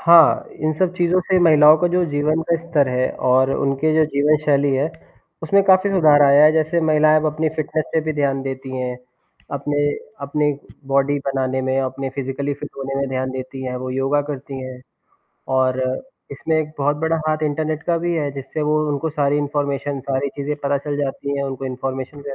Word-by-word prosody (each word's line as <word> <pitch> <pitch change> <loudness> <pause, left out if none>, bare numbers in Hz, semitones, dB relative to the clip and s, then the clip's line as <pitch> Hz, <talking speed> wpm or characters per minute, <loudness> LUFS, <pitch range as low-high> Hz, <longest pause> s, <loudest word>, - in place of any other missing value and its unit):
हाँ, 165 -3 +6 0.2
इन 155 +1 0
सब 185 -1 +1
चीज़ों 175 +1 +2
से 190 - +4
महिलाओं 155 -2 +7
का 175 - +2
जो 180 +1 +1
जीवन 150 +2 0
का 170 - +4
स्तर 160 -5 0
है 125 0 0 0.2
और 130 +1 +4
उनके 140 +3 0
जो 160 0 +4
जीवनशैली 145 -1 +2
है, 140 +4 0 0.5
उसमें 200 +5 +3
काफ़ी 190 +1 +4
सुधार 155 -6 +5
आया 140 +1 +6
है 155 - +6
जैसे 160 +2 +1
महिलाएँ 155 -1 +4
अब 155 - -1
अपनी 155 +1 0
फिटनेस 155 0 -2
पे 160 - +3
भी 155 0 -3
ध्यान 140 -2 -1
देती 130 -1 -6
हैं, 125 -1 -3 0.6
अपने 145 +1 -1 0.4
अपने 150 +1 0 0.4
बॉडी 140 +1 +2
बनाने 130 -1 -1
में, 130 +1 0
अपने 135 0 -4
फिजिकली 140 +1 -3
फिट 145 +1 -8
होने 135 0 -4
में 140 0 -1
ध्यान 130 0 -2
देती 130 +1 -7
हैं, 125 0 -3
वो 130 0 -5
योगा 135 +3 +1
करती 135 -1 -6
हैं। 130 -1 -8 0.8
और 130 0 +1 0.5
इसमें 160 +3 -1
एक 155 -1 -3
बहुत 145 +1 +1
बड़ा 160 0 +1
हाथ 155 0 -1
इंटरनेट 155 +1 -2
का 170 0 0
भी 175 +1 -1
है 150 -3 -1
जिससे 140 +3 -5
वो 150 +1 +1
उनको 145 +3 -2
सारी 145 -1 +1
इन्फॉर्मेशन, 145 -1 -2
सारी 135 +1 -2
चीज़ें 145 +1 -2
पता 140 0 +1
चल 145 +1 -4
जाती 140 0 -3
हैं, 140 - -1
उनको 135 -1 -5
इन्फॉर्मेशन 130 +2 -5
भी 140 -1 -6
145 Hz, 195 wpm, -20 LUFS, 135-155 Hz, 0.8 s, महिलाओं